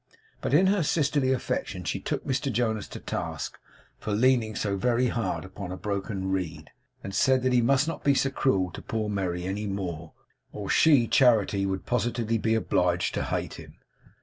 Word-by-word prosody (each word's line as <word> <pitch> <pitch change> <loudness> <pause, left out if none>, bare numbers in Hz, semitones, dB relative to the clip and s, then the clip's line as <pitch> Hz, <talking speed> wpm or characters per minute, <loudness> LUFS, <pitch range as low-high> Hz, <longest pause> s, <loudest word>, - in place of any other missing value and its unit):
But - - +1
in 180 +5 +5
her 195 0 +3
sisterly 145 -4 +1
affection 130 - -2
she - - -2
took - - -3
Mr 135 +1 -1
Jonas 110 -4 -1
to - - -8
task - - -4 0.4
for 105 - -3
leaning 115 -1 +2
so 100 -1 -1
very 120 +5 +1
hard 115 -5 -2
upon 95 0 -7
a 95 - -5
broken 100 -1 -3
reed, 80 -5 -3 0.3
and 95 - -6
said 130 +4 +3
that 130 -1 +2
he 125 - +4
must 135 +5 +3
not 165 - -4
be 140 -1 +4
so 135 0 +1
cruel 95 -10 +1
to - - -8
poor 110 -1 -3
Merry 90 -3 -2
any 100 +3 -3
more, 85 -5 -4 0.4
or 100 -2 -4
she 140 -7 +5
(Charity) 110 -7 +3
would 95 -1 -3
positively 115 -1 0
be 110 +1 +1
obliged 90 -5 +1
to - - -1
hate - - -2
him. - - -12
110 Hz, 185 wpm, -27 LUFS, 95-130 Hz, 0.4 s, in